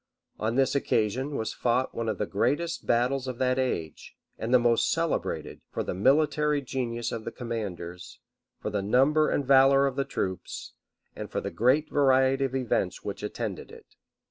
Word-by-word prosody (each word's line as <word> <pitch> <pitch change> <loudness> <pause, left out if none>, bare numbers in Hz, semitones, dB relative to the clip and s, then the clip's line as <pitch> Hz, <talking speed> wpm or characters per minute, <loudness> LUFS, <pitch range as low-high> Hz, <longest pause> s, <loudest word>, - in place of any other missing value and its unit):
On 110 +2 -1
this 135 0 +2
occasion 130 +1 0
was 110 - -2
fought 125 +2 0
one 115 -1 -2
of 105 - -2
the 105 - -1
greatest 145 +12 -1
battles 125 +3 +1
of 130 -2 -4
that 130 0 +1
age; 85 - -3 0.2
and 115 - -4
the 130 - +7
most 120 -1 +2
celebrated, 165 -1 -2
for - - -3
the - - -3
military 150 - +2
genius 120 -3 -3
of 115 -1 -4
the 115 - -5
commanders, 95 -7 -6 0.4
for 105 - -4
the 100 -1 -1
number 135 +9 +3
and 140 - 0
valor 135 +1 +6
of 135 -2 -1
the 140 - +1
troops, 95 -8 -5 0.4
and - - -6
for - - -2
the - - -5
great 130 +7 +2
variety 135 -1 +3
of 135 0 -3
events 130 -3 -1
which - - -5
attended - - -5
it. - - -16
130 Hz, 175 wpm, -27 LUFS, 115-135 Hz, 0.4 s, the